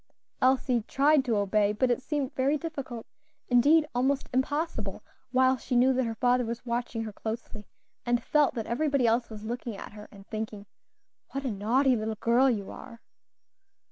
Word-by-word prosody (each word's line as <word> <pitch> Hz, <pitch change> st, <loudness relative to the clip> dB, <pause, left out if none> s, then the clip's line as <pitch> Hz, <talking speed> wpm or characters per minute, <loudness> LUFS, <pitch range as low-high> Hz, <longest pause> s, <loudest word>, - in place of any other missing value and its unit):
Elsie 255 Hz, -2 st, +3 dB
tried 285 Hz, +1 st, +3 dB
to 235 Hz, -5 st, 0 dB
obey, 205 Hz, +1 st, +2 dB
but 245 Hz, +4 st, +1 dB
it 245 Hz, -, 0 dB
seemed 285 Hz, -2 st, -2 dB
very 275 Hz, +3 st, +1 dB
difficult, 275 Hz, -7 st, -6 dB, 0.4 s
indeed 290 Hz, +6 st, +5 dB
almost 265 Hz, +3 st, 0 dB
impossible, 260 Hz, -, -2 dB, 0.3 s
while 260 Hz, 0 st, +4 dB
she 250 Hz, +1 st, -3 dB
knew 255 Hz, +2 st, +5 dB
that 260 Hz, 0 st, +1 dB
her 225 Hz, -, -3 dB
father 245 Hz, +2 st, +2 dB
was 235 Hz, +1 st, -5 dB
watching 235 Hz, -1 st, -2 dB
her 215 Hz, -2 st, -6 dB
closely, 220 Hz, -1 st, -6 dB, 0.4 s
and 240 Hz, -1 st, 0 dB
felt 300 Hz, -2 st, +2 dB
that 225 Hz, -2 st, -3 dB
everybody 280 Hz, +1 st, +1 dB
else 235 Hz, +1 st, +2 dB
was 215 Hz, -1 st, -9 dB
looking 235 Hz, -2 st, -4 dB
at -, -, -9 dB
her 210 Hz, 0 st, -11 dB
and 195 Hz, -1 st, -14 dB
thinking, 215 Hz, -2 st, -5 dB, 0.7 s
"What 275 Hz, 0 st, -3 dB
a 255 Hz, -, 0 dB
naughty 245 Hz, +6 st, +2 dB
little 220 Hz, -1 st, -2 dB
girl 240 Hz, +5 st, +3 dB
you 205 Hz, -5 st, -2 dB
are!" 235 Hz, -3 st, -11 dB
245 Hz, 170 wpm, -28 LUFS, 220-265 Hz, 0.7 s, indeed